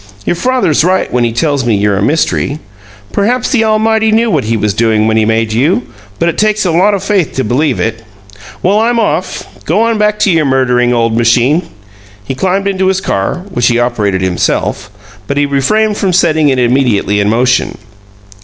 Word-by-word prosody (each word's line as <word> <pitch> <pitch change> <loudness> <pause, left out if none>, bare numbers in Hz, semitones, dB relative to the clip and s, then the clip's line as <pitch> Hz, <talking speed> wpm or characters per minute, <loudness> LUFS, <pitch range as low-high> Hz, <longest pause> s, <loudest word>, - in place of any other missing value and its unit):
"Your - - 0
father's 245 - +1
right 185 +2 0
when 125 -1 +1
he 115 - -1
tells 140 +3 -1
me 120 -3 +1
you're 100 0 +1
a 95 - -1
mystery. 145 +2 0 0.5
Perhaps 240 +5 0
the 240 -5 +2
Almighty 220 0 +1
knew 225 +1 +2
what 145 - 0
He 115 +1 0
was 105 -1 -1
doing 110 0 +1
when 110 0 +1
He 110 -1 +2
made 110 0 0
you, 160 - +1 0.3
but 170 - 0
it 170 - -2
takes 215 -1 +1
a 175 - +1
lot 190 +5 +2
of 195 - -5
faith 200 -5 0
to 130 - -2
believe 130 +5 0
it! 110 0 -3 0.6
Well, 200 +4 +2
I'm 235 +1 +1
off. 185 -4 -2 0.2
Go 220 - +1
on 230 -1 0
back 210 0 +1
to 200 - +3
your 160 -3 +2
murdering 125 -2 +1
old 115 -2 0
machine." 120 +8 +1 0.5
He 120 - -4
climbed 190 +8 -1
into 190 -1 0
his 190 0 +1
car, 170 - -3
which 120 -6 +1
he 120 - +2
operated 105 -6 -1
himself, 95 +3 -1 0.4
but 140 - -3
he 145 - +2
refrained 205 +11 0
from 190 -2 0
setting 160 -4 +2
it 130 - +1
immediately 120 -5 +1
in 100 0 +1
motion. 125 +3 0
145 Hz, 200 wpm, -11 LUFS, -, 0.6 s, to